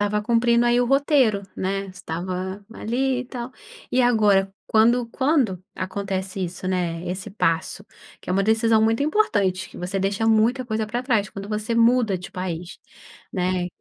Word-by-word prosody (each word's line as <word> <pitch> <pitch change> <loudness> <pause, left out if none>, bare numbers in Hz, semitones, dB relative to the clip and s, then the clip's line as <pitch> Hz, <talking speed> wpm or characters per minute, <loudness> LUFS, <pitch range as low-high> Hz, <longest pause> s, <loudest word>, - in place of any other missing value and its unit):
Tava 210 +1 0
cumprindo 235 +1 +3
aí 240 0 +3
o 245 - +1
roteiro, 270 -6 +3
né? 195 +1 -2
Estava 185 +2 -5
ali 255 +4 -1
e - - -13
tal. 245 -1 -6 0.4
E 255 - +2
agora, 210 -5 +4 0.2
quando 235 +2 +3
quando 260 - +1
acontece 190 0 -3
isso 180 +1 -5
né, 175 -2 -1
esse 185 +3 -5
passo, 180 +1 -1 0.4
que - - -7
é - - +2
uma 195 +1 +2
decisão 220 +1 +3
muito 225 +4 +2
importante, 205 - +1
que - - -14
você 185 +2 -3
deixa 195 +3 -1
muita 225 +4 +3
coisa 220 -2 -2
para 240 +3 -3
trás 225 -6 +1
quando 195 +1 -8
você 215 +2 -2
muda 230 -3 +3
de 180 - -9
país, 180 -1 -5 0.5
né? 180 -1 0
210 Hz, 165 wpm, -23 LUFS, 185-235 Hz, 0.5 s, agora